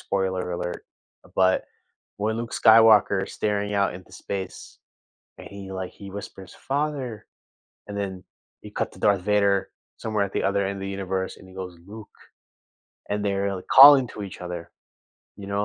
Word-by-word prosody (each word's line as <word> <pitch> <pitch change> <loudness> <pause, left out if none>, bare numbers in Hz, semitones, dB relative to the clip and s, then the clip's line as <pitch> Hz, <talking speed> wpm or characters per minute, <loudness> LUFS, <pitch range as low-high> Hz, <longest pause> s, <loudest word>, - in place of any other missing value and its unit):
spoiler 95 -2 -2
alert. 90 0 -4 0.4
Uh, - - -18
but, 95 0 +3 0.5
when 110 +2 -1
Luke 115 0 -5
Skywalker's 110 -3 +5
staring 105 -1 -1
out 100 -2 +1
into 90 0 -12
space, 95 -1 -7 0.6
and - - -11
he, 100 -1 -9
like, 95 -1 -5
he 100 -1 -11
whispers, 95 -1 -9
"Father," 135 -5 -3 0.6
and 100 - -7
then, 95 -3 -4 0.4
you - - -10
cut - - -3
to - - -15
Darth 100 -3 +2
Vader, 100 -1 +2 0.3
somewhere 110 -2 -1
at 100 - -7
the - - 0
other 100 0 +1
end 100 0 -3
of 95 - -8
the 95 - -4
universe, 95 -1 -3
and 95 - -15
he 95 - -15
goes, 90 -2 -7
"Luke," 105 +1 -10 1.0
and 105 0 -1
they're, 100 0 0
like, 90 - -10
calling 135 -2 +9
to 105 - -8
each 95 -3 -8
other. 90 -1 -6 0.7
You 100 - -9
know, 100 +1 0
100 Hz, 175 wpm, -24 LUFS, 95-105 Hz, 1.0 s, calling